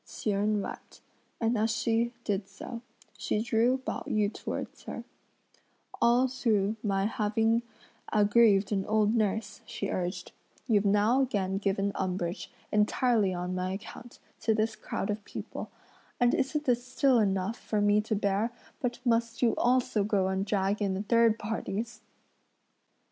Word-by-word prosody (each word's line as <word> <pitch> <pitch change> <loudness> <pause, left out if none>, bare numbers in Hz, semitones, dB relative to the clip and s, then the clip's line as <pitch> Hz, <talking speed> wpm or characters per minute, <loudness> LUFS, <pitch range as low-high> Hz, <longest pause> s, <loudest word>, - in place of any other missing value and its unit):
Hsi 215 - -3
Jen 205 +1 +1
wept, - - -9 0.4
and 230 +1 +1
as 220 +1 +1
she, 230 0 +1
did 200 -2 -1
so, 230 +4 -8 0.4
she - - 0
drew 235 +3 +2
Pao 260 - -4
yü 210 0 +1
towards - - -5
her: - - -6 1.0
"All 240 +2 +5
through 220 -5 +1
my 195 -2 0
having 225 +2 +1 0.5
aggrieved 205 -1 +4
an 195 -2 +1
old 215 0 +3
nurse," 210 -2 -1
she 200 - -4
urged, 180 0 -3 0.4
"you've 210 -4 +3
now 210 +6 +4
again 195 -7 0
given 200 0 0
umbrage, 185 -1 -3 0.2
entirely 210 0 +2
on 180 0 -3
my 185 0 -2
account, 225 +4 -9 0.2
to 220 -1 +1
this 220 0 0
crowd 195 - -3
of 210 0 -4
people; - - -7 0.5
and 245 -1 +4
isn't 295 +3 0
this 245 -1 +2
still 260 0 +3
enough 195 +1 0
for 215 - -2
me 205 0 +4
to 215 0 -2
bear 200 +3 0 0.3
but 245 -2 -2
must 230 0 +1
you 230 -2 +4
also 245 -4 +2
go 195 -2 +1
and 190 +1 -1
drag 200 +1 0
in 195 -1 0
third 230 0 +4
parties?" 220 +1 -4
215 Hz, 150 wpm, -29 LUFS, 200-230 Hz, 1.0 s, All